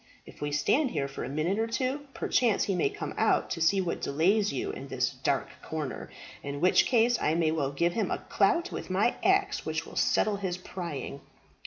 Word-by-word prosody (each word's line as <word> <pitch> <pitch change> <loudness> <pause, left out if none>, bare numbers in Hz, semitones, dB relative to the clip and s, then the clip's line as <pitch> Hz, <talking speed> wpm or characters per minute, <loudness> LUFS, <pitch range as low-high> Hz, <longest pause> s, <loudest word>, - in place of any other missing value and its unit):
If - - -15
we 145 0 -2
stand 260 - +2
here 140 - -1
for 140 - -6
a - - -4
minute 160 +8 0
or 225 - +1
two, 265 +5 -2
perchance 230 -5 +2
he 195 - 0
may 185 - +2
come 415 0 -6
out - - +2
to 165 - -3
see 195 +5 +4
what 175 -2 -3
delays 195 +9 +2
you 400 +2 -2
in 415 - -8
this - - 0
dark - - -1
corner, - - -5 0.3
in 140 0 -5
which 180 +4 +4
case 240 -1 +3
I 155 - +2
may 165 -2 +2
well 145 -4 -1
give 170 +5 +1
him 225 - 0
a - - 0
clout 345 +1 +2
with - - -6
my 195 +6 +2
axe 395 +1 +2
which - - -3
will - - -11
settle 210 -1 +2
his 185 -3 -3
prying." 170 -7 -6
190 Hz, 210 wpm, -29 LUFS, 160-240 Hz, 0.3 s, see